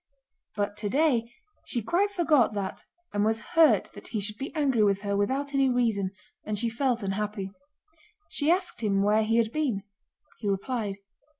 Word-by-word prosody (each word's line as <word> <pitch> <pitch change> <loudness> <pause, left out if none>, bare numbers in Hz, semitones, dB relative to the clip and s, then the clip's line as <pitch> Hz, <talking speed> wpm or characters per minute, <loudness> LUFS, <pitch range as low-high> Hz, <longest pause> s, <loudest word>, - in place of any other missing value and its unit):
But 205 -1 -1
today 235 +2 +1 0.3
she 235 - -2
quite 365 - +2
forgot 310 - +3
that 195 -2 -4 0.3
and 205 0 +1
was 220 +1 +1
hurt 325 -2 +5
that - - -11
he 220 - -2
should 210 +1 -2
be 275 - -4
angry 275 -7 +2
with 200 -1 +3
her 200 -1 -1
without 270 +8 0
any 270 -1 +3
reason, 225 -6 +1 0.3
and 215 -1 -3
she 230 +3 0
felt 240 -1 0
unhappy. 200 0 -2 0.8
She 295 +1 -1
asked 360 -3 +1
him 200 -3 +2
where 210 +2 +4
he 225 +1 +2
had 225 -1 +2
been. 255 -10 -1 0.6
He 210 - -2
replied. 205 +1 -2
225 Hz, 170 wpm, -28 LUFS, 205-275 Hz, 0.8 s, hurt